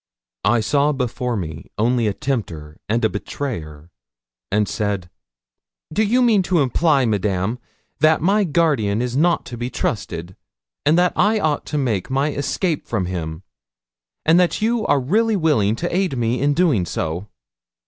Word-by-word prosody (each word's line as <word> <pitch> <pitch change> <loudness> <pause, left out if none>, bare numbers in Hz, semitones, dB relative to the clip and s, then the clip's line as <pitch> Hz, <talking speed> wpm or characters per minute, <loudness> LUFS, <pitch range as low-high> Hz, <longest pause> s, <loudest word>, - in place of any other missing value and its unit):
I 115 +2 +3
saw 145 +6 +2
before 125 -2 -2
me 80 -4 -6
only 115 +1 +2
a 105 - 0
tempter 90 - -4
and 115 +2 +1
betrayer, 85 - -6 0.6
and 105 +1 +2
said 100 -4 -2 0.8
'Do 210 - +1
you 245 +4 +3
mean 220 -5 +4
to 175 -4 +2
imply, 140 0 +2
Madame, 105 +1 0 0.4
that 155 +1 +4
my 200 +6 +2
guardian 145 - +1
is 125 0 -2
not 170 +5 +2
to 120 - -7
be 120 +1 -3
trusted, 90 -7 -3 0.5
and 155 +3 +5
that 180 0 +3
I 215 +3 +3
ought 155 -6 -1
to 150 - -2
make 115 -9 -1
my 135 +3 +1
escape 150 +3 -2
from 105 -6 -1
him, 85 -2 -5 0.8
and 165 +3 +5
that 180 -1 +2
you 225 +1 0
are 145 - +3
really 215 - +1
willing 145 - +2
to 175 +7 -3
aid 185 -8 0
me 120 +1 0
in 145 +1 +2
doing 140 - +2
so?' 85 +6 -3
125 Hz, 160 wpm, -21 LUFS, 105-165 Hz, 0.8 s, and